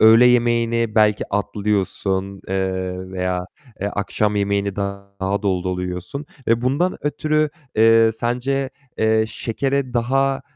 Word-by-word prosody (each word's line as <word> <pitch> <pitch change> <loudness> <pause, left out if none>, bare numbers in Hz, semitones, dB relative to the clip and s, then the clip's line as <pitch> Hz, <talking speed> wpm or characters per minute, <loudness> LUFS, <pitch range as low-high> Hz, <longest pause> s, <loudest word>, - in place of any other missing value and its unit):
öğle 115 +2 +8
yemeğini 115 -2 +2
belki 105 -1 +3
atlıyorsun, 100 -2 -1
eee, 95 -1 -2
veya 90 -1 -2 0.5
akşam, 105 +1 0
eee, - - +2
yemeğini 100 -1 0
daha 100 0 -3
dolu 95 -2 0
dolu 90 0 -2
yiyorsun, 90 - -5 0.2
eee, 115 +1 +3
bundan 145 +9 +1
ötürü, 155 0 +1 0.3
eee, 115 0 +6
sence, 125 +4 -1 0.3
eee, 110 0 +3
şekere 135 +3 -2
daha, 135 +3 +1
110 Hz, 120 wpm, -21 LUFS, 95-125 Hz, 0.5 s, öğle